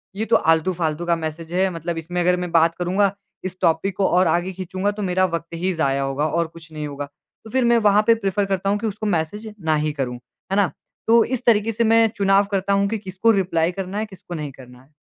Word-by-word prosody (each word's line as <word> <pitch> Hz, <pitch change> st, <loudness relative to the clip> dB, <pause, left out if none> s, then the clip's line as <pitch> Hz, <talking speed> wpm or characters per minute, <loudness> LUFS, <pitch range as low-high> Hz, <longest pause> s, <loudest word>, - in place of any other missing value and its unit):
ये 215 Hz, +3 st, -2 dB
तो 230 Hz, -, +3 dB
आलतू-फालतू 165 Hz, 0 st, +1 dB
का 170 Hz, 0 st, +2 dB
मैसेज 160 Hz, 0 st, -6 dB
है 190 Hz, +1 st, +2 dB
मतलब 165 Hz, 0 st, -4 dB
इसमें 175 Hz, +2 st, -4 dB
अगर 180 Hz, +1 st, +3 dB
मैं 180 Hz, -1 st, -4 dB
बात 165 Hz, 0 st, +4 dB
करूँगा 185 Hz, +3 st, +1 dB, 0.3 s
इस 185 Hz, 0 st, -5 dB
टॉपिक 170 Hz, +2 st, +1 dB
को 195 Hz, -, +2 dB
और 180 Hz, +1 st, +3 dB
आगे 175 Hz, +2 st, +1 dB
खींचूँगा 185 Hz, +2 st, -2 dB
तो 210 Hz, +1 st, -7 dB
मेरा 185 Hz, 0 st, +2 dB
वक़्त 170 Hz, -2 st, -3 dB
ही 180 Hz, +3 st, -1 dB
ज़ाया 140 Hz, -4 st, 0 dB
होगा 135 Hz, +2 st, -1 dB
और 170 Hz, +2 st, 0 dB
कुछ 165 Hz, 0 st, -14 dB
नहीं 150 Hz, -1 st, -5 dB
होगा। 145 Hz, 0 st, -5 dB, 0.4 s
तो 220 Hz, -, -11 dB
फिर 260 Hz, +1 st, +1 dB
मैं 235 Hz, 0 st, +4 dB
वहाँ 210 Hz, -2 st, +4 dB
पे 230 Hz, -, +6 dB
प्रेफ़र 200 Hz, -2 st, -1 dB
करता 195 Hz, 0 st, -1 dB
हूँ 205 Hz, -, +2 dB
कि 225 Hz, -, -2 dB
उसको 210 Hz, +1 st, -5 dB
मैसेज 205 Hz, +5 st, -2 dB
ना 155 Hz, -1 st, +3 dB
ही 155 Hz, -, 0 dB
करूँ, 130 Hz, -4 st, -3 dB, 0.4 s
है -, -, +2 dB
ना? 200 Hz, -6 st, +2 dB, 0.4 s
तो 230 Hz, 0 st, +6 dB
इस 255 Hz, 0 st, -3 dB
तरीके 225 Hz, -1 st, +3 dB
से 230 Hz, +1 st, 0 dB
मैं 225 Hz, 0 st, +5 dB
चुनाव 200 Hz, -1 st, +3 dB
करता 195 Hz, 0 st, 0 dB
हूँ 200 Hz, 0 st, +2 dB
कि 225 Hz, -, -1 dB
किसको 195 Hz, +2 st, +1 dB
रिप्लाई 175 Hz, -4 st, +1 dB
करना 190 Hz, +2 st, -5 dB
है, 215 Hz, -, -1 dB
किसको 190 Hz, -4 st, -11 dB
नहीं 150 Hz, -3 st, -5 dB
करना 125 Hz, -1 st, -15 dB
है। 140 Hz, +3 st, -26 dB
185 Hz, 245 wpm, -22 LUFS, 165-205 Hz, 0.4 s, पे